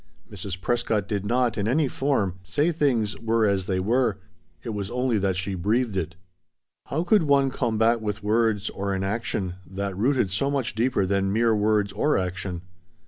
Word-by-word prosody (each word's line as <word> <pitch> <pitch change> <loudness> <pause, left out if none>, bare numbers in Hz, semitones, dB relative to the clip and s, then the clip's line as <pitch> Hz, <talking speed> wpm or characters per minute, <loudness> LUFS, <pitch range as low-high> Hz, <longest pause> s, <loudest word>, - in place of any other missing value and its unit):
Mrs. 95 -2 -6
Prescott 110 -1 0
did 100 -1 -2
not, 120 -1 +1
in 100 - 0
any 140 +5 +2
form, 110 -10 -1
say 145 - 0
things 125 -10 +1
were 115 -1 +1
as 100 -2 +1
they 95 -2 0
were; 115 +2 +1 0.5
it 120 - -5
was 100 -3 -3
only 125 -2 0
that 95 -1 0
she 90 +2 -2
breathed 105 +5 0
it. 85 -1 -2 0.7
How 160 +4 -1
could 205 +3 +4
one 140 -3 +3
combat 115 -2 +1
with 105 -1 -3
words, 110 -1 +1
or 100 0 -2
in 95 - -2
action, 95 -3 -2
that 100 0 -4
rooted 120 -1 +1
so 120 +9 0
much 130 -3 -1
deeper 115 -3 +1
than 95 0 0
mere 115 +1 +3
words 105 -1 +1
or 150 - +2
action? 90 -1 -3
105 Hz, 180 wpm, -25 LUFS, 95-125 Hz, 0.7 s, could